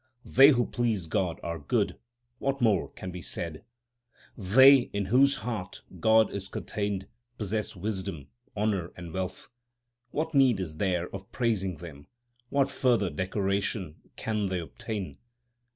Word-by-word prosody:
They 135 +2 +7
who 120 -5 +3
please 115 -7 -1
God 85 +1 -1
are 85 -1 -3
good; 100 - 0 0.4
what 135 0 -1
more 110 -7 +2
can 90 - -8
be 90 0 -7
said? 85 -2 -4 0.7
They 130 +7 +6
in 100 -1 -1
whose 140 +2 +6
heart 105 -4 -5 0.2
God 110 +3 +4
is 95 -1 -3
contained 100 -2 -3 0.3
possess 105 0 -2
wisdom, 95 -6 -4 0.3
honour, 100 -5 -1
and 85 -2 -8
wealth. 95 0 -4 0.6
What 160 +5 -2
need 130 -7 +4
is 80 -5 -5
there 90 -2 0
of 95 0 -8
praising 100 -8 0
them? 75 -3 -11 0.4
What 140 -1 +2
further 120 -8 +1
decoration 95 0 -1 0.2
can 105 -2 -1
they 95 -1 -1
obtain 100 +4 -6
100 Hz, 135 wpm, -28 LUFS, 90-115 Hz, 0.7 s, They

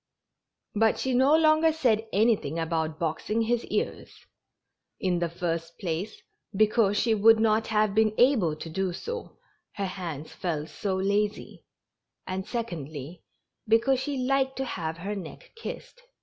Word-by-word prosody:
But 220 +1 +3
she 260 - -1
no 265 +5 +5
longer 315 0 +4
said 230 -8 +1
anything 200 -8 +2
about 160 -1 -1
boxing 170 +8 -1
his 235 +1 0
ears; - - -3 0.9
in 180 -2 0
the 170 -1 0
first 165 -1 -3
place, 185 +4 -4 0.4
because 215 0 +3
she 230 - +2
would 220 +1 +6
not 220 0 +2
have 215 -2 +2
been 215 0 +3
able 230 - +4
to 155 - -8
do 185 +2 -2
so, 470 - -6 0.4
her 200 - -2
hands 170 -6 -6
felt 160 -3 -3
so 190 +5 -2
lazy, 205 +2 -1 0.6
and, 190 0 -4
secondly, 160 - -5 0.5
because 230 +4 +3
she 280 +1 -3
liked 265 +1 +1
to 265 - -1
have 165 -8 -4
her 200 +5 -4
neck 185 -5 -9
kissed. 480 +2 -8
210 Hz, 145 wpm, -27 LUFS, 170-235 Hz, 0.9 s, would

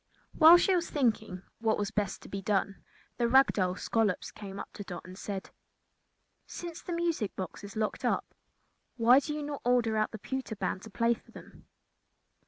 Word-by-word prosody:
While 325 +2 +9
she 370 +1 +3
was 345 -1 -1
thinking 220 -9 0 0.2
what 225 -1 +1
was 205 0 -2
best 205 -2 -2
to - - -11
be 195 - -5
done, 195 0 -1 0.3
the 235 - +2
rag 265 +3 +5
doll 185 -2 0
Scollops 215 -2 0
came 200 -1 -8
up - - -8
to 205 - -7
Dot 180 -3 -8
and 185 0 -10
said: 195 0 -6 1.0
"Since 345 -1 -7
the - - -7
music 335 - -1
box 185 +2 -6
is 200 +2 -9
locked 215 -1 -2
up, - - +1 0.7
why 240 +3 +7
do 285 - -5
you 300 - -4
not 290 -1 -5
order 240 -3 +2
out 215 - +1
the 220 - -7
pewter 260 +1 -4
band 190 - -2
to 220 - -10
play 230 +3 +2
for - - -14
them?" - - -14
220 Hz, 190 wpm, -30 LUFS, 200-265 Hz, 1.0 s, While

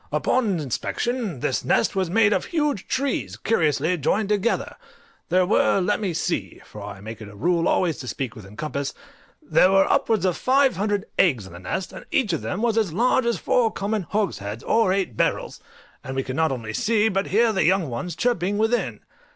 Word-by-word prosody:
Upon 215 -9 +1
inspection, 185 - -3
this 130 - -1
nest - - +1
was 190 -3 0
made 210 +2 +4
of - - 0
huge 295 - -1
trees 195 - -2
curiously 160 - +1
joined 200 +8 0
together; 210 +2 0 0.5
there 180 +1 +3
were, 195 0 +3
let 200 +3 +1
me 200 -4 -1
see 165 - -2
(for 105 - -11
I 100 -1 -8
make 110 +1 -8
it 110 - -8
a 105 - -13
rule 170 - +1
always 170 -4 +1
to 125 - -7
speak 125 -1 -4
within 105 -2 -12
compass), 140 -2 -3 0.5
there 185 - +4
were 195 0 +5
upwards 220 -4 +2
of 180 -2 +1
five 270 +1 +3
hundred 205 0 -1
eggs 130 - +3
in 95 - -12
the 85 - -9
nest, 180 - -4
and - - -9
each 220 -9 +1
of 165 - -1
them 200 +5 -3
was 230 -1 +2
as 210 -6 0
large 240 +6 +2
as 235 - +1
four 240 -3 +2
common 200 -3 -2
hogsheads, 110 - -2
or 225 -4 +2
eight 190 - -1
barrels, - - -1 0.4
and 130 - -6
we 135 - 0
could 130 - -5
not 160 0 +2
only 115 -4 -4
see, 220 - +2
but 195 -2 0
hear 225 +2 +3
the 190 - +2
young 185 -2 +2
ones 135 +7 -4
chirping 205 -4 0
within. 225 +3 0
185 Hz, 200 wpm, -23 LUFS, 135-220 Hz, 0.5 s, were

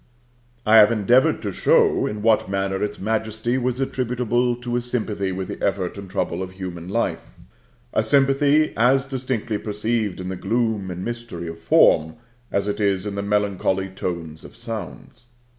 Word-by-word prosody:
I 110 0 +6
have 105 +1 +8
endeavored 120 +4 +3
to - - -2
show - - +3
in 105 0 -5
what 110 -4 +3
manner 95 0 -1
its 105 - -3
majesty 110 +3 -1
was 125 0 -1
attributable 125 -2 0
to 120 0 -4
a 120 - +1
sympathy 110 -5 -2
with 95 0 -4
the - - -7
effort 95 -2 -1
and 100 -2 -9
trouble 90 - -2
of 95 0 -6
human 90 -2 -7
life 115 +4 -2 0.6
(a - - +3
sympathy 140 +2 +3
as 130 +3 +3
distinctly 125 -5 -3
perceived 105 -1 -2
in 90 0 -5
the 95 - -3
gloom 110 -1 -1
and 90 +1 -5
mystery 120 -8 -5
of 80 0 -7
form, 80 -1 +4 0.4
as 100 0 0
it 105 - -2
is 100 -1 +1
in 105 - -3
the 100 - -3
melancholy 100 -2 0
tones 85 -4 -5
of - - -13
sounds). 120 - -8
105 Hz, 170 wpm, -22 LUFS, 95-120 Hz, 0.6 s, have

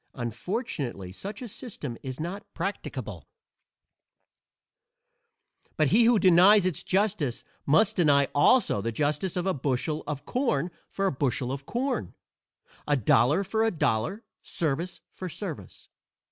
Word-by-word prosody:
Unfortunately 125 - -4
such 200 - -7
a - - -5
system 190 - -7
is 130 +1 -6
not 180 +6 -6
practicable, - - -5 2.5
but 155 -3 +3
he 230 +4 +5
who 235 0 +5
denies 185 +2 +6
its 185 -5 0
justice 190 - 0 0.2
must 160 +9 +3
deny 145 -5 +4
also 145 - +4
the 115 +3 -2
justice 150 - -1
of 180 - -1
a 190 - +1
bushel 145 +2 -1
of 145 -1 -4
corn 180 - 0 0.2
for 195 - -2
a 195 - +2
bushel 130 -2 -1
of 140 +1 -6
corn, 255 +2 -2 0.7
a 145 -1 +3
dollar 135 - +3
for 220 +3 0
a 225 - +3
dollar, 155 - -1 0.2
service 165 +3 -2
for 185 - -6
service. 155 - -7
165 Hz, 130 wpm, -27 LUFS, 135-200 Hz, 2.5 s, denies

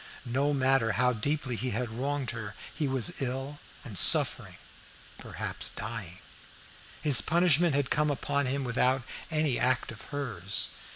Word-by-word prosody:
No 135 +4 -1
matter 135 -5 +1
how 125 +1 +1
deeply 130 +2 -1
he 130 +3 -3
had 120 +1 -3
wronged 135 +3 -3
her, 110 -4 -7 0.2
he 150 - -2
was 135 +6 0
ill 135 +3 -4 0.2
and 120 -7 -8
suffering - - +6 0.6
perhaps - - -5
dying. 105 -4 -7 0.9
His 140 -9 +7
punishment 170 - +2
had 140 -2 -1
come 150 0 +1
upon 140 0 -2
him 135 +2 -2
without 125 +1 0 0.3
any 155 -5 0
act 130 -2 0
of 110 - -12
hers. 110 -10 -2
130 Hz, 140 wpm, -28 LUFS, 115-145 Hz, 0.9 s, His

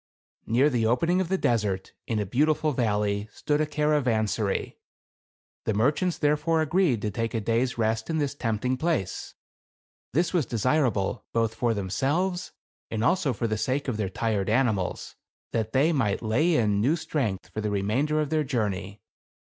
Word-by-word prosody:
Near 125 +6 +4
the 115 -3 +1
opening 165 +10 +2
of 180 - -3
the 190 - +2
desert, 105 - 0
in 115 - -1
a 105 - 0
beautiful 150 +8 +2
valley, 105 -4 0
stood 150 0 0
a 155 - +1
caravansary. 125 -9 0 0.9
The 110 - 0
merchants 150 - +1
therefore 155 +2 +2
agreed 155 - +1
to 105 - -1
take 115 +2 -2
a - - +1
day's 115 +4 0
rest 110 0 0
in 160 - 0
this 145 -3 0
tempting 125 -1 -1
place. 155 - -2 0.8
This 170 +7 +1
was 165 -9 +1
desirable 120 -3 0
both 115 -1 +1
for 120 +2 -1
190 100 -5 -1
THE - - -2
CAB 135 - +2
AVAN. 170 +6 +2
themselves, 180 0 -7 0.4
and 110 -1 -2
also 145 +2 +2
for 115 0 -3
the 110 -2 -1
sake 135 +4 -1
of 125 -5 -1
their 105 -3 -1
fired 105 0 -1
animals, 110 -5 0 0.4
that 110 -1 -1
they 145 +7 +3
might 115 -7 0
lay 155 +10 +2
in 105 -5 +2
new 140 +9 +3
strength 130 - -2
for 110 - -3
the 105 - -1
remainder 110 +10 0
of 150 -2 -1
their 155 -1 +2
journey. 105 -7 -3
120 Hz, 180 wpm, -26 LUFS, 110-150 Hz, 0.9 s, Near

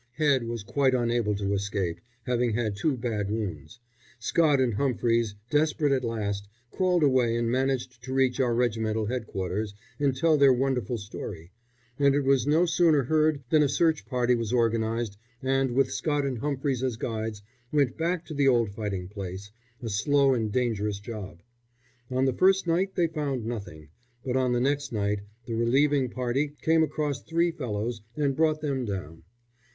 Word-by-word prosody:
Head 140 -4 +2
was 115 -2 -4
quite 130 +4 +2
unable 120 -3 +1
to 100 0 -1
escape, 100 -3 -2 0.2
having 120 -1 0
had 110 -2 -1
two 135 +6 0
bad 110 -4 -2
wounds. 105 -1 -4 0.4
Scott 145 +4 +2
and 125 -3 +2
Humphries, 115 -3 +1 0.2
desperate 150 -1 +2
at 130 -2 +1
last, 100 -3 -3 0.2
crawled 180 -3 +2
away 130 -4 +3
and 115 0 0
managed 130 -1 -1
to 130 - -7
reach 130 -1 +2
our 120 -3 +2
regimental 110 -2 0
headquarters 105 -3 -3 0.2
and 140 -2 +1
tell 155 +2 +3
their 140 -2 +6
wonderful 125 -2 0
story, 95 -5 -8 0.5
and 140 -1 +4
it 145 - +2
was 135 0 +2
no 160 +4 +4
sooner 165 -4 +3
heard 155 +1 +2
than 155 - +5
a 145 - +3
search 160 +1 +1
party 125 -1 +1
was 115 -2 -1
organised, 115 -3 0 0.2
and, 135 0 +1
with 135 -1 +2
Scott 145 -2 0
and 130 -4 -2
Humphries 140 -2 -1
as 130 -4 -1
guides, 110 -3 -4 0.3
went 140 -4 +2
back 170 +1 -1
to 155 - -7
the 140 -1 +2
old 120 -5 +3
fighting 100 -3 -4
place 100 0 -7 0.3
a 115 - -3
slow 135 +7 +3
and 110 -4 -1
dangerous 105 -4 0
job. 100 -5 -8 0.7
On 130 +1 +1
the 130 - +2
first 190 +6 +3
night 180 +3 0
they 175 - +3
found 145 -7 -2
nothing, 100 -10 -6 0.4
but 125 -1 -1
on 130 -1 +2
the 120 - +2
next 140 +1 0
night 105 -2 0 0.3
the 115 - -4
relieving 130 +4 +2
party 130 +4 -1
came 160 0 +4
across 150 -3 -1
three 170 +1 +1
fellows 115 -6 -3 0.2
and 140 -3 +1
brought 155 0 +2
them 140 -4 -1
down. 90 -7 -5
125 Hz, 170 wpm, -27 LUFS, 110-140 Hz, 0.7 s, their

